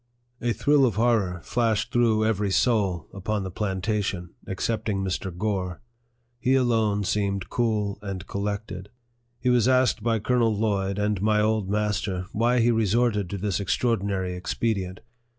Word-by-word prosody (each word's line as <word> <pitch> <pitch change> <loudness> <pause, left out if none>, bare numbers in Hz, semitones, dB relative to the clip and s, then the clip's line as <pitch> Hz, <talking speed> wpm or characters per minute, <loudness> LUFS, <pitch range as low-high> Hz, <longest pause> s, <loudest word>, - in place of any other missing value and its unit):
A 120 - +1
thrill 145 +4 +3
of 110 - -2
horror 105 -6 +1
flashed 110 -2 0
through 115 -3 +3
every 105 -2 +1
soul 95 -6 +1
upon 100 +1 -2
the 95 - -5
plantation, 95 -2 -2 0.2
excepting 105 0 -1
Mr. 95 0 -2
Gore. 95 -4 -2 0.6
He 130 +2 +2
alone 110 -5 +2
seemed 100 -1 -1
cool 105 -4 0
and 95 -2 -5
collected. 100 -1 -4 0.5
He 125 - +1
was 120 -2 +3
asked 130 -3 +3
by 115 +1 +1
Colonel 115 0 +1
Lloyd 100 -2 0
and 105 -2 0
my 105 0 +3
old 105 -2 +1
master, 105 -3 -1
why 120 +3 +2
he 120 +1 +4
resorted 110 -2 +1
to 100 - -3
this 100 0 -1
extraordinary 100 -3 0
expedient. 95 0 -2
105 Hz, 145 wpm, -25 LUFS, 95-115 Hz, 0.6 s, he